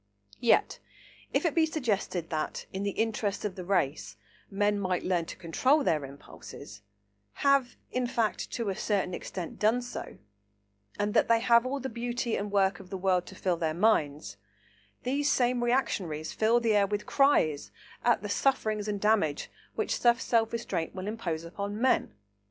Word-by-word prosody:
Yet 235 - +3 0.5
if - - +1
it 330 - +2
be 320 0 +3
suggested 205 - -2
that, 155 -1 -3
in 190 - -3
the 200 - 0
interests 220 -2 -1
of 205 - -2
the 185 - -6
race, 175 -6 -1 0.3
men 205 +1 +1
might 185 -2 -1
learn 175 -3 0
to - - -8
control 260 - +2
their 155 - +1
impulses,—have, 100 - -4
in 250 -1 0
fact, 230 -3 -1
to 230 -4 -2
a 195 - -2
certain 195 -3 -1
extent 175 -1 -6
done 220 +4 +3
so,—and 100 - -8
that - - +4
they 230 0 +4
have 235 +1 +4
all 275 +2 -2
the 265 - -4
beauty 240 0 -2
and 205 0 -3
work 195 -2 +2
of 190 -2 -12
the 190 - -4
world 185 -1 +1
to - - -10
fill 180 -2 0
their 160 -2 -1
minds, 160 -7 +1 0.7
these 285 +3 +1
same 245 -1 +2
reactionaries 185 - -1
fill 225 +2 +3
the 225 -2 +2
air 200 -1 +4
with 205 +1 -3
cries 245 - +2 0.3
at - - +3
the - - -3
sufferings 215 -6 0
and 205 -1 -2
damage 200 -9 +1 0.2
which - - -1
such 235 -1 +4
self 225 -1 +1
restraint 220 -8 -3
will 185 0 -5
impose 175 -7 -3
upon 200 +5 -5
men. 255 - +2
205 Hz, 170 wpm, -29 LUFS, 165-235 Hz, 0.7 s, that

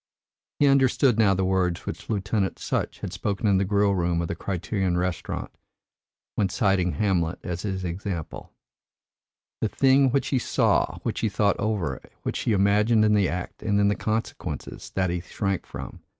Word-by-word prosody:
He 145 - +4
understood 135 -3 +4
now 100 -3 +5
the 95 0 0
words 90 -2 0
which - - -6
Lieutenant 100 -1 -1
Sutch - - -3
had - - -5
spoken 100 0 -2
in 100 -2 +4
the - - +2
grill 100 0 +2
room 85 -2 0
of 85 - -2
the - - -2
Criterion 95 -1 -1
Restaurant, 90 -2 -3 0.8
when 100 -2 +1
citing 95 -4 +1
Hamlet 90 -5 0
as 85 -1 -4
his 95 -3 -3
example, 90 -1 -5 1.1
"The 110 - 0
thing 135 +2 +4
which 135 +2 0
he 130 - +2
saw, - - +1
which - - -2
he 110 - +1
thought 100 0 +1
over, 100 - -1 0.2
which - - -2
he - - 0
imagined 105 +2 +4
in 105 - +3
the 100 -3 +3
act 90 0 -5
and 100 -1 +1
in 100 0 +4
the 100 - +1
consequence 110 +2 -4
that 95 -2 0
he 90 0 -2
shrank 95 +1 -3
from. - - -8
100 Hz, 175 wpm, -25 LUFS, 90-110 Hz, 1.1 s, now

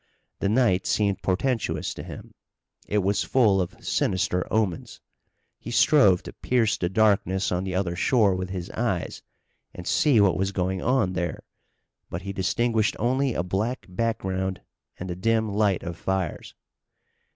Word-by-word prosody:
The 100 - 0
night 110 -5 +2
seemed 100 -2 +1
portentous 115 +5 -1
to - - -8
him. - - -10 0.5
It 105 -1 +1
was 100 +2 +1
full 105 -7 +3
of 90 - -6
sinister 95 -1 0
omens. 105 -6 -1 0.6
He - - -8
strove 115 -6 +4
to - - -9
pierce 115 -4 +1
the 90 - -2
darkness 95 -2 +2
on 90 +1 -1
the 95 -1 -3
other 90 -2 -1
shore 105 +1 +3
with 90 0 -4
his 95 -1 -5
eyes, 110 -7 -2 0.5
and 90 - -8
see 140 - +3
what 100 -3 +4
was 95 +1 0
going 95 0 -1
on 125 -7 +1
there, 85 -2 -3 0.7
but 85 +2 -5
he 100 0 -5
distinguished 110 +3 +1
only 130 +2 0
a 85 - 0
black 105 +8 -2
background 95 -3 -2 0.4
and 90 - -6
the 90 - -4
dim 110 +2 0
light 100 -3 +1
of 85 -2 -6
fires. 95 -3 -3
95 Hz, 155 wpm, -25 LUFS, 90-115 Hz, 0.7 s, strove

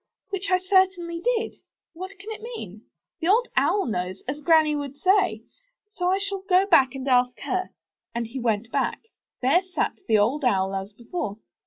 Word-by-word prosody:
Which 390 0 -3
I 370 - +5
certainly 370 -2 +1
did. 465 -2 0 0.4
What 375 +4 -8
can 405 +4 -8
it 440 - -7
mean? 230 - -8 0.3
The 325 - -2
Old 465 +6 +3
Owl 335 +9 +3
knows, 185 -4 -3
as 290 +3 -4
Granny 315 -1 +4
would 285 -1 -5
say; 375 +3 +2 0.5
so 360 -3 -1
I 380 - +3
shall 400 -1 -3
go 380 0 +3
back 270 -9 +4
and 265 0 -5
ask 250 -1 +3
her." 370 -1 -2 0.5
And 235 0 -1
back 225 - -12
he 265 - -4
went. 225 -2 0 0.8
There 275 +8 +4
sat 370 -1 -2
the 220 - +4
Old 245 +9 +2
Owl 195 -6 +2
as 195 +1 -4
before. 225 - -5
330 Hz, 180 wpm, -25 LUFS, 245-380 Hz, 0.8 s, I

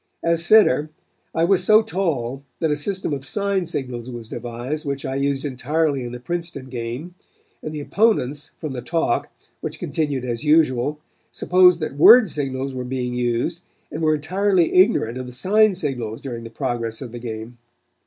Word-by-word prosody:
As 170 0 +1
center, 155 -7 +5 0.5
I 165 - +2
was 190 +2 +3
so 215 +1 +6
tall 140 - -2 0.2
that 160 -2 +1
a - - +2
system 185 +2 -2
of 135 -2 -4
sign 200 +3 -1
signals 125 -4 -5
was 120 -3 -8
devised 120 +6 -5
which 140 -1 -4
I 130 - -3
used 140 +1 -1
entirely 145 +1 0
in 120 - -5
the 125 - -7
Princeton 170 -2 -5
game, 125 +7 -5 0.5
and 155 - -5
the 150 -1 -5
opponents, 150 - +1
from 155 -4 -5
the 125 - -5
talk, 160 -1 -1 0.3
which - - -5
continued 145 -5 -2
as 120 0 -3
usual, 150 -2 +2 0.3
supposed 180 -1 +4
that 150 -3 -4
word 220 +5 +8
signals 135 -2 -3
were 130 -1 -4
being 125 -1 -3
used 125 +8 -1 0.3
and 155 - -5
were 155 -1 +3
entirely 185 +3 +1
ignorant 130 - +3
of 130 - -6
the - - -8
sign 200 - +3
signals 125 - -4
during 120 -4 -6
the - - -7
progress 115 -1 -3
of 120 - -8
the 120 - -7
game. 115 0 -7
140 Hz, 175 wpm, -22 LUFS, 125-170 Hz, 0.5 s, word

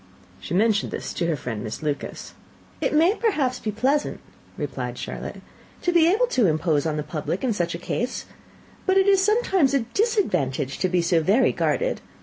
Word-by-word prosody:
She - - -4
mentioned 210 +1 +2
this - - -5
to 170 - -1
her 165 - +1
friend, 120 -5 -5
Miss 110 +6 -6
Lucas. 145 -2 -4 0.5
"It - - +1
may, 335 +6 +5
perhaps, 290 - 0
be 220 - -3
pleasant," 270 +7 0 0.4
replied - - -4
Charlotte, - - -6 0.4
"to 355 - +2
be 335 0 +5
able 455 +6 +3
to 250 - +2
impose 155 -1 +1
on 155 -1 -1
the 150 - -2
public 155 - -4
in 250 -3 +1
such 170 -4 -1
a - - -3
case; 240 +8 -3 0.6
but 380 0 +4
it 385 - +5
is 390 -1 +5
sometimes 385 - +2
a 275 - +3
disadvantage 180 - 0
to 185 - +1
be 180 -1 +1
so 170 -1 +3
very 205 +11 +3
guarded. - - 0
220 Hz, 185 wpm, -24 LUFS, -, 0.6 s, may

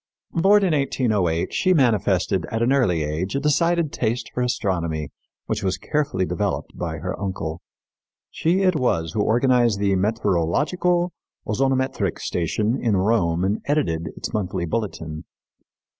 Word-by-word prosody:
Born 195 +4 +4
in 180 -4 +2
1808, 105 - 0
she 185 0 +3
manifested 100 - +2
at 115 +1 -1
an 125 +3 +3
early 90 - +2
age 80 - -3
a - - +1
decided 160 +2 +1
taste 115 +1 -2
for 125 - -2
astronomy, 85 - -1 0.4
which - - -2
was 95 -1 0
carefully 140 -11 -1
developed - - -2
by 80 -2 -4
her 90 +4 -4
uncle. 90 -4 -4 0.7
She 180 +4 +1
it 185 -2 +3
was 85 - 0
who 110 - 0
organized 120 -1 +3
the 100 0 +1
Meteorologico 115 - +1 0.3
Ozonometric 130 -4 0
station 105 +7 -1
in 110 -4 +2
Rome 95 -4 +1
and 100 +3 0
edited 85 - 0
its - - -5
monthly 95 -4 -2
bulletin. 80 -6 -4
105 Hz, 140 wpm, -23 LUFS, 90-135 Hz, 0.7 s, Born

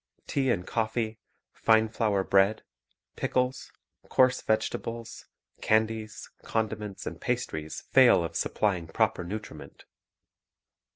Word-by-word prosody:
Tea 135 -2 0
and 90 -7 0
coffee, 110 0 -2 0.3
fine 110 0 +3
flour 110 -3 0
bread, 100 +3 +3 0.5
pickles, 125 0 -1 0.4
coarse 130 0 +4
vege 110 0 +1
tables, 115 0 -7 0.3
candies, 110 0 0
condiments, 110 -3 -3
and - - -6
pastries 75 0 -3
fail - - +5
of - - -5
supplying 95 -6 0
proper 110 0 0
nutriment. 105 +5 -8
110 Hz, 105 wpm, -28 LUFS, 100-115 Hz, 0.5 s, fail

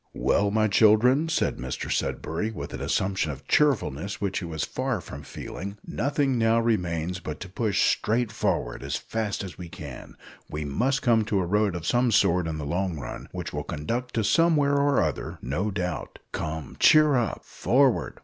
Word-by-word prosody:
"Well, 100 0 +2
my 110 +1 +2
children," 115 +9 +4
said 160 - 0
Mr 65 0 -4
Sudberry, 85 +8 -1
with - - -7
an - - -5
assumption 95 -5 0
of 70 0 -10
cheerfulness 100 - +1
which 100 -2 -1
he 90 - -6
was 80 -2 -3
far 130 -4 -2
from 75 -4 -9
feeling, 100 +7 -7
"nothing 140 0 0
now 115 0 +3
remains 90 -6 0
but 75 -4 -6
to 95 - -5
push 105 +1 0
straight 115 0 +1
forward - - -1
as - - -3
fast 110 -3 -3
as 95 -2 -8
we 85 -1 -7
can. 70 -6 -9 0.3
We 75 0 -4
must 125 - 0
come 115 -4 +4
to 105 -2 +1
a 90 - 0
road 105 0 +1
of 85 -1 -5
some 120 0 +2
sort 90 -4 +3
in 80 -1 -3
the 75 - -4
long 90 +2 -1
run, 65 - -7
which - - -5
will - - -3
conduct 120 +12 -4
to 115 - +1
somewhere 150 +3 +3
or 140 -1 +3
other, - - -3
no 85 - -2
doubt. 90 -3 -4
Come, 80 -2 -5
cheer 155 -1 +6
up; 120 -7 -1
forward! 130 -1 +1
100 Hz, 185 wpm, -26 LUFS, 85-120 Hz, 0.3 s, cheer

